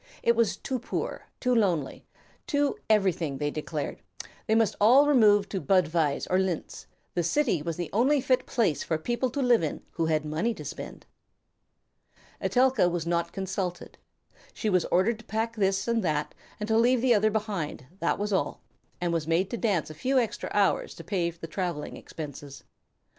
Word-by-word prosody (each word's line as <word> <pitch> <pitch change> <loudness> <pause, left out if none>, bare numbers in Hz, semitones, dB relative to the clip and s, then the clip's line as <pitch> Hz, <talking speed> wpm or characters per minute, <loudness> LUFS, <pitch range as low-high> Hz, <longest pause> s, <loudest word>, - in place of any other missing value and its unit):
It 235 - +4
was 220 -4 +2
too 260 -1 -3
poor, 245 - -4
too 250 -1 +1
lonely, 180 - 0 0.4
too 285 -1 +1
everything, 180 -9 +2
they 145 +1 -1
declared; 150 -1 -4 0.5
they 220 - +3
must 225 -2 +2
all 255 +7 +7
remove 210 -8 +5
to 190 - -3
Budweis 165 -6 +2
or 185 - +2
Linz; 185 -4 -3 0.3
the 175 - +1
city 180 - +1
was 165 +1 -4
the 175 -3 -4
only 265 +7 +3
fit 255 -1 +1
place 205 - +1
for 160 - -1
people 240 +9 -1
to 275 +3 -2
live 245 -4 +4
in 155 - -3
who 165 -1 -1
had 155 -1 +1
money 165 +10 -1
to - - -9
spend. - - -8 1.4
Etelka 255 -7 +3
was 175 -2 -2
not 170 0 0
consulted. 190 -2 -4 0.6
She 215 - -1
was 180 -2 +2
ordered 215 +5 +2
to 220 - -14
pack 225 +1 -2
this 195 -1 +1
and 230 -2 +1
that, 150 -3 -1 0.3
and 210 - -3
to 220 0 +3
leave 245 +1 +3
the 255 -2 +5
other 215 0 +3
behind, 205 - -3
that - - +1
was 205 0 -2
all, 190 - -1 0.4
and 175 -1 -1
was 160 -2 -1
made 170 +4 +1
to - - -1
dance 175 - 0
a - - -7
few 255 - 0
extra 235 -4 -1
hours 205 -2 +1
to - - -10
pay 180 -4 0
the 170 -1 -9
travelling 170 -2 -4
expenses. 145 -2 -9
195 Hz, 180 wpm, -27 LUFS, 165-230 Hz, 1.4 s, all